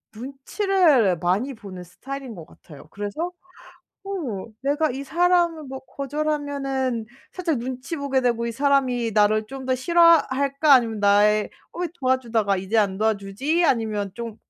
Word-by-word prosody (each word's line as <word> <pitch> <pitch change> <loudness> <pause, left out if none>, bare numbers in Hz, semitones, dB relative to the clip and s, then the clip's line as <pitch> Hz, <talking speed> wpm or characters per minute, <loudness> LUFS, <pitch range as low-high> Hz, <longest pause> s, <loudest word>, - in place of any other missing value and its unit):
눈치를 275 - +1
많이 195 - 0
보는 195 -6 -10
스타일인 265 +8 -8
것 165 -3 -10
같아요. 150 -2 -16
그래서 205 - -4 0.7
'어 310 - -4 0.2
내가 290 +3 +1
이 265 +2 -5
사람을 340 +1 +2
뭐 265 -1 -7
거절하면은 275 -4 -3 0.3
살짝 340 -7 -1
눈치 255 +6 -5
보게 280 -2 0
되고 235 -2 0
이 235 - -3
사람이 260 -3 +1
나를 215 +1 +3
좀 270 +2 -8
더 260 - +2
싫어할까?' 290 -2 +3
아니면 230 -4 +4
나의, 205 +1 +3 0.2
'어 - - -7
왜 355 - -1
도와주다가 235 -6 +1
이제 190 +4 -1
안 200 -3 +1
도와주지?' 220 - 0
아니면 215 - 0
'좀 230 -1 -7
260 Hz, 305 characters per minute, -23 LUFS, 215-285 Hz, 0.7 s, 아니면